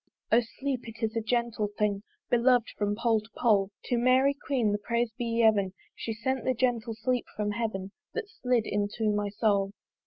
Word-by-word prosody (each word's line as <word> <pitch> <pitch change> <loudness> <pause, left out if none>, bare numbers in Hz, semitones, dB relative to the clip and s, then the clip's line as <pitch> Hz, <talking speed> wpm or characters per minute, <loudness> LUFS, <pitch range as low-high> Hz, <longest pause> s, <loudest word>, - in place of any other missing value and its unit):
O 230 - +7 0.2
sleep, 265 -3 -2
it 225 0 -9
is 220 +1 0
a 225 - +1
gentle 235 -1 0
thing 205 -2 +1 0.3
Belov'd 245 0 +4
from 205 0 0
pole 230 0 +2
to 215 - -17
pole! 205 -5 +3
To 245 - 0
Mary 260 +3 +4
queen 265 -6 0
the 205 - 0
praise 235 +2 0
be 240 - -3 0.2
yeven 200 -4 +4 0.2
She 230 - -4
sent 245 +3 -2
the 255 - +1
gentle 235 -2 0
sleep 245 +2 -1
from 210 -1 -1
heaven 205 -3 -3 0.2
That 450 -2 -2
slid 250 - 0
into 205 +2 0
my 205 0 0
soul. 200 -1 +1
225 Hz, 185 wpm, -29 LUFS, 210-245 Hz, 0.3 s, O